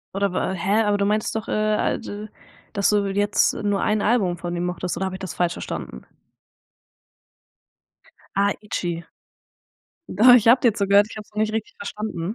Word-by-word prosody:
Oder 200 -1 0
wa 185 +1 -1
hä, 200 +5 +1
aber 205 0 +2
du 200 - 0
meintest 215 +2 0
doch, 220 - -4
äh, 215 0 +1
halt, - - -2 0.6
dass 200 -2 +2
du 205 -1 +2
jetzt 205 +1 +2
nur 205 -1 -1
1 215 -1 +1
Album 200 -7 +1
von 175 +1 -5
dem 175 - -2
mochtest 180 0 -3
oder 190 - -2
habe 185 - -5
ich 190 - -9
das 185 -6 -6
falsch 175 +2 0
verstanden? 65 - -7 2.3
Ah, 200 +1 +3
„ITCHY“. 175 -5 -4 1.0
Doch, 245 +6 +6
ich 230 -2 +4
habe 245 +3 +6
dir 230 -4 +3
zugehört, 200 0 +4
ich - - -10
hab's 210 - -9
nur 210 - -3
nicht 215 0 0
richtig 220 -1 -4
verstanden. 200 -2 -5
200 Hz, 180 wpm, -23 LUFS, 185-215 Hz, 2.3 s, Doch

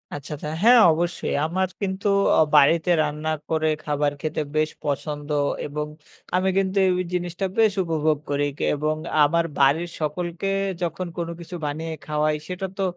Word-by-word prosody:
আচ্ছা, 145 0 -8
আচ্ছা। 150 +1 -6
হ্যাঁ, 240 +2 +8
অবশ্যই। 170 +2 -2
আমার 185 +4 0
কিন্তু 195 +1 -2 0.3
অ - - +5 0.2
বাড়িতে 155 +4 +5
রান্না 150 +1 -2 0.2
করে 160 -1 +1 0.2
খাবার 145 -1 0
খেতে 155 0 -2
বেশ 155 0 +2 0.2
পছন্দ 145 +1 -3 0.4
এবং 150 +1 -3 0.5
আমি 185 +1 +2
কিন্তু 195 0 0
এই - - +3 0.2
জিনিসটা 175 +1 -2
বেশ 220 -2 +5
উপভোগ 155 -2 +1
করি 145 0 +1
ক - - -20
এবং 155 +1 0 0.3
আমার 170 +3 +2
বাড়ির 145 +5 +3
সকলকে 170 +4 -3 0.3
যখন 175 +1 -2
কোন 170 -1 -2
কিছু 175 +1 -8
বানিয়ে 160 +3 -3
খাওয়াই 150 0 +1
সেটা 185 +1 -4
তো 195 - 0
160 Hz, 155 wpm, -24 LUFS, 150-180 Hz, 0.5 s, হ্যাঁ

